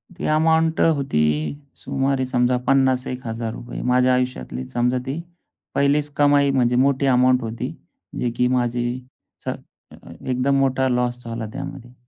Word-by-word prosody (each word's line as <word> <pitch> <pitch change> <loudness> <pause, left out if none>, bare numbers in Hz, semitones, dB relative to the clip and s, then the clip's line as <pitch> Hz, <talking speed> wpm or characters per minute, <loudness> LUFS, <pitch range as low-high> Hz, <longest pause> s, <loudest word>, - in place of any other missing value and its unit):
ती - - -5
अमाउंट 160 0 +2
होती 140 - +2 0.5
सुमारे 135 -1 -1
समजा 125 0 +1
पन्नास 130 -1 +3
एक 125 0 -6
हजार 115 0 -3
रुपये 120 0 -7
माझ्या 125 0 +4
आयुष्यातली 125 0 -2
समजा 125 +1 +2
ती 140 +4 -3 0.6
पहिलीच 145 +1 +2
कमाई 145 -1 +4
म्हणजे 125 -2 +2
मोठी 140 0 +1
अमाउंट 125 0 +4
होती. 115 0 -4 0.5
जे 125 - 0
की 125 - +3
माझी 120 -1 0 1.4
एकदम 130 +2 0
मोठा 130 -1 +2
लॉस 125 0 -1
झाला 115 -1 -4
त्यामध्ये. 120 -1 -7
130 Hz, 135 wpm, -22 LUFS, 125-140 Hz, 1.4 s, माझ्या